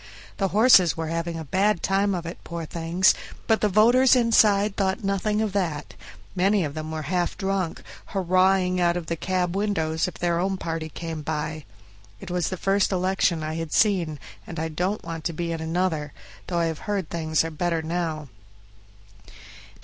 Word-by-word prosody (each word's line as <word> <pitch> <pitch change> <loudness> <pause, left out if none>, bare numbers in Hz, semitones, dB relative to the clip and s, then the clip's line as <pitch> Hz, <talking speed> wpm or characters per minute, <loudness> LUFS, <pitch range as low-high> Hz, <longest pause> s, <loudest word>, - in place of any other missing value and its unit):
The 195 - +1
horses 195 -5 +5
were 160 -1 -3
having 165 0 -3
a 160 - -6
bad 195 +4 +1
time 195 0 +1
of 170 -1 -5
it, 170 - -7
poor 170 -1 -5
things! 170 +4 +2 0.3
but 220 -1 +2
the 210 - +3
voters 240 +6 +5
inside 215 -4 +4
thought 195 +3 -1
nothing 210 +2 0
of 210 -3 -2
that; 170 -7 -2 0.4
many 195 +1 +2
of 145 - -5
them 155 0 -5
were 160 -1 -4
half 175 +4 -1
drunk, 190 -3 -2 0.2
hurrahing 185 -1 +2
out 175 0 +2
of 175 - -5
the 170 - -2
cab 180 +1 -1
windows 165 -6 0
if 180 - -7
their 170 -1 0
own 190 +1 0
party 165 -2 -4
came 165 0 -6
by. 155 0 -4 0.5
It 175 - -8
was 180 -3 0
the 185 - -4
first 195 +2 +1
election 185 -3 +1
I 155 0 -3
had 165 -1 -4
seen, 180 -8 +2 0.3
and 170 - -7
I 160 0 -2
don't 180 +6 -2
want 165 -1 -6
to 170 - -1
be 170 +1 -3
in 165 -1 -3
another, 160 -3 -1 0.3
though 175 - -2
I 170 - +2
have 160 -2 -3
heard 195 -5 -2
things 160 -2 0
are 165 - -4
better 165 +1 -1
now. 160 -2 -3
175 Hz, 185 wpm, -25 LUFS, 160-195 Hz, 0.5 s, horses